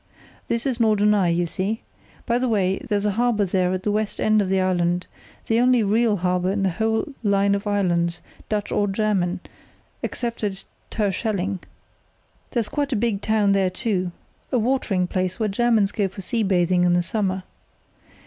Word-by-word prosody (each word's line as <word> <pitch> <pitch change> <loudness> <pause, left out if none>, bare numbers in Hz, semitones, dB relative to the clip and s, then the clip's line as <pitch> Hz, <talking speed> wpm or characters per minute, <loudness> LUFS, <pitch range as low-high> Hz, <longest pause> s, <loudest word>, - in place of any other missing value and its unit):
"Here's 235 +1 -1
Norderney, 210 -4 +3
you 175 +1 +1
see. 195 +6 -2 0.4
By 235 0 +1
the 255 0 0
way, 195 -4 +1
there's 205 -1 +1
a 210 - +2
harbour 225 -1 +1
there 180 -1 +1
at 185 0 -2
the 210 - 0
west 215 0 -1
end 215 0 +3
of 190 - -1
the 190 0 +2
island, 180 -1 +1 0.4
the 225 +1 +2
only 250 -1 +4
real 215 +1 +2
harbour 180 +1 0
on 200 0 -1
the 190 - +2
whole 220 - -1
line 200 -2 +2
of 200 +1 -2
islands, 175 -4 +1 0.3
Dutch 210 -1 -2
or 205 - +1
German, 195 -3 0 0.6
except 235 -2 -4
at 195 -2 -2 0.3
Terschelling. 200 -2 -1 0.9
There's 235 -3 -1
quite 285 -1 -2
a - - +1
big 215 -2 0
town 215 -2 +2
there, 195 -1 +3
too, 185 -2 -2 0.4
a 255 - +2
watering 225 -6 +1
place, 185 0 -2
where 220 - +1
Germans 215 -1 +2
go 205 -3 0
for 195 +1 -9
sea 230 +4 0
bathing 180 -3 +2
in 175 0 +3
the 175 0 +2
summer. 190 -1 -1
200 Hz, 175 wpm, -23 LUFS, 185-220 Hz, 0.9 s, only